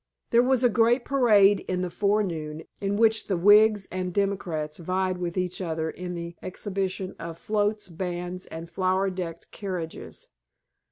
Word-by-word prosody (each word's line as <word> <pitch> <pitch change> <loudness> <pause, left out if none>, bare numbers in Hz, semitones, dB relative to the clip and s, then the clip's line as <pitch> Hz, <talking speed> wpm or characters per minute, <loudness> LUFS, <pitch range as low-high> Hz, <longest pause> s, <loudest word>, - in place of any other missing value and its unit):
There 235 - +6
was 255 0 +2
a - - +7
great 235 +2 +3
parade 210 -7 +5
in 185 0 -1
the 180 - -3
forenoon, 175 -6 -1 0.2
in 200 0 -1
which 220 0 +3
the 190 - 0
Whigs 205 +2 +5
and 185 0 -3
Democrats 175 -6 -1
vied 185 +1 -1
with 175 0 -3
each 180 0 -2
other 160 -2 -2
in 180 0 -6
the 170 0 -6
exhibition 190 0 -3
of 165 0 -6
floats, 210 +1 -1
bands, 180 +1 -5
and 165 +1 -7
flower 185 +2 0
decked 170 -3 -6
carriages. 180 -5 -6
185 Hz, 155 wpm, -26 LUFS, 175-205 Hz, 0.2 s, a